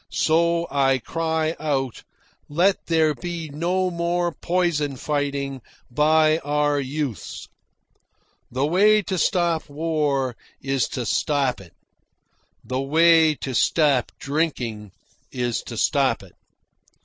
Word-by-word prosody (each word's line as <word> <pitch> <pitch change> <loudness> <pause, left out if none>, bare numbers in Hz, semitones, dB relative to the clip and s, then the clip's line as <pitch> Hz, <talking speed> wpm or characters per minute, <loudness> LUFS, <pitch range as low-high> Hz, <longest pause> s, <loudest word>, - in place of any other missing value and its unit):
so 170 +1 +2
I 135 -1 +3
cry 160 +3 -2
out, 135 -5 -2 0.5
"Let 180 +6 +1
there 160 -2 +3
be 165 +2 -6
no 180 +5 -1
more 175 0 -1
poison 170 -6 0
fighting 140 -1 -2 0.3
by 155 +3 +3
our 145 0 0
youths!" 135 - -4 1.0
The 130 +3 -1
way 205 +6 +4
to 185 +1 -2
stop 170 -5 +1
war 145 -4 -1 0.2
is 135 -2 0
to 125 -6 -4
stop 135 -2 0
it. 90 -3 -16 0.9
The 130 +1 -3
way 160 +2 +4
to 135 -2 -5
stop 140 -1 +2
drinking 125 - -2 0.4
is 120 -2 -2
to - - -6
stop - - +1
it. - - -16
150 Hz, 115 wpm, -23 LUFS, 135-165 Hz, 1.0 s, way